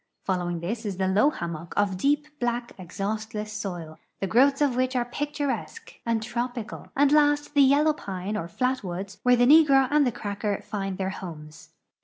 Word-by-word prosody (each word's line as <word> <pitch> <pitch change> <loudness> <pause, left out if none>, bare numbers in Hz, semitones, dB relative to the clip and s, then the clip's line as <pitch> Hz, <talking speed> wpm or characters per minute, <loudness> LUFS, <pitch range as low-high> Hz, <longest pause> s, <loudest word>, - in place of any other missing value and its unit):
Following 175 -3 -2
this 220 +7 -3
is 200 -4 -4
the 190 0 0
low 205 +9 +4
hammock 170 - -6
of 205 -2 +2
deep, 290 +9 +1
black, 240 0 -2
exhaustless 215 +4 -4
soil, 175 -6 -6 0.2
the - - -1
growths 270 +7 +4
of 285 -4 +2
which 255 +1 0
are 245 -1 +1
picturesque 290 - -4
and 225 -1 +1
trop 240 +2 -3
ical, 230 -4 -7
and 285 0 +4
last 295 -1 +3
the 285 - +5
yellow 285 +3 +5
pine 195 -5 -5
or 170 -5 -3
flat 255 +7 -1
woods 190 +2 -6
where 250 0 +5
the 245 0 +4
negro 275 -2 +6
and 295 -2 +4
the - - +1
cracker 205 -3 -3
find 195 -3 -4
their 190 0 -2
liomes. 155 -5 -9
220 Hz, 185 wpm, -26 LUFS, 190-270 Hz, 0.2 s, negro